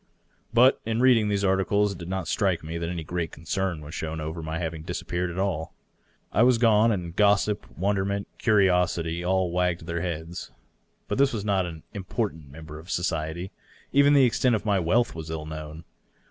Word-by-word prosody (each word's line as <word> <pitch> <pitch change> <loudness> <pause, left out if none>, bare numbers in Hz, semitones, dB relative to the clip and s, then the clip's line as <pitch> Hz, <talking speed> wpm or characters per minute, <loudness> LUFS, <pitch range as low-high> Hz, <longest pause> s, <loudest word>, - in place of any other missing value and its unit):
But 125 +3 +5
in 115 +1 -1
reading 120 -4 +4
these 100 -1 0
articles 100 +2 +2
it 100 - -8
did 85 0 -7
not 95 -3 -3
strike 95 -3 0
me 80 +2 -5
that 85 0 -3
any 85 -2 -4
great 85 0 -3
concern 85 +1 -3
was 75 +1 -9
shown 80 -1 -4
as 80 +1 -4
to 85 - -6
my 80 +1 -4
having 80 -2 -4
disappeared 90 +2 -3
at 85 - -7
all. 90 -5 -2 0.6
I 105 - +2
was 125 0 +5
gone, 115 -1 +4
and 90 -5 -3
gossip, 105 0 +2
wonderment, 100 +1 0
curiosity, 90 -5 +2
all 95 -1 +1
wagged 90 -1 0
their 85 0 -3
heads. 85 0 -5 0.6
But - - -2
I 140 - +5
was 105 -3 -4
not 95 -3 +1
an 80 -2 -9
important 95 - -4
member 75 +1 -10
of 85 +4 -14
society. 85 +1 -2 0.4
Even 140 +1 +6
the 135 -2 +7
extent 125 0 +2
of 105 - -4
my 100 -2 +2
wealth 110 +8 +2
was 80 -1 -7
ill 80 -1 -4
known. 80 +1 -7
90 Hz, 190 wpm, -26 LUFS, 80-105 Hz, 0.6 s, the